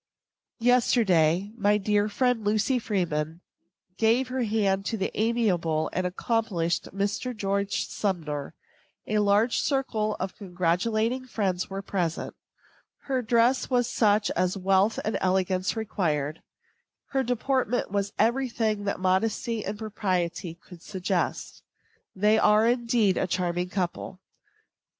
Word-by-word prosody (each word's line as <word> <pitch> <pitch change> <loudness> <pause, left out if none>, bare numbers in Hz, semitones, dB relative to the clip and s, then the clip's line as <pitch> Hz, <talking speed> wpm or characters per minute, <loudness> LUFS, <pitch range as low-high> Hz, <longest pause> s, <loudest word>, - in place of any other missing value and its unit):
Yesterday, 205 -7 +3
my 205 -2 +3
dear 210 0 +1
friend, 250 0 +1
Lucy 215 +5 +1
Freeman, 170 -7 -2 0.6
gave 235 +3 +3
her 260 0 -2
hand 205 -4 +1
to 225 - -1
the 195 - -2
amiable 190 -9 0
and 185 0 0
accomplished 180 -4 -1
Mr. 205 +5 -2
George 200 0 -1
Sumner. 155 -7 -3 0.5
A 215 0 0
large 210 +3 +3
circle 225 -6 0
of 185 0 -4
congratulating 215 +7 -1
friends 190 -6 -1
were 195 0 -5
present. 175 -5 -2 0.7
Her 265 -3 -1
dress 235 +2 +2
was 245 -2 +2
such 210 -4 +2
as 185 +2 0
wealth 195 +3 +2
and 215 - -1
elegance 185 +1 +1
required. 160 -9 -2 0.7
Her 270 - +1
deportment 250 -2 0
was 200 0 -1
every 255 +3 +2
thing 215 -3 -1
that 200 - -2
modesty 215 +4 0
and 205 +2 -4
propriety 185 -5 -2
could 170 0 -15
suggest. 185 -1 -3 0.5
They 210 +3 +3
are, 210 +2 +4
indeed, 235 -5 +2
a 190 - 0
charming 180 0 -1
couple. 185 0 -3
205 Hz, 120 wpm, -26 LUFS, 185-230 Hz, 0.7 s, are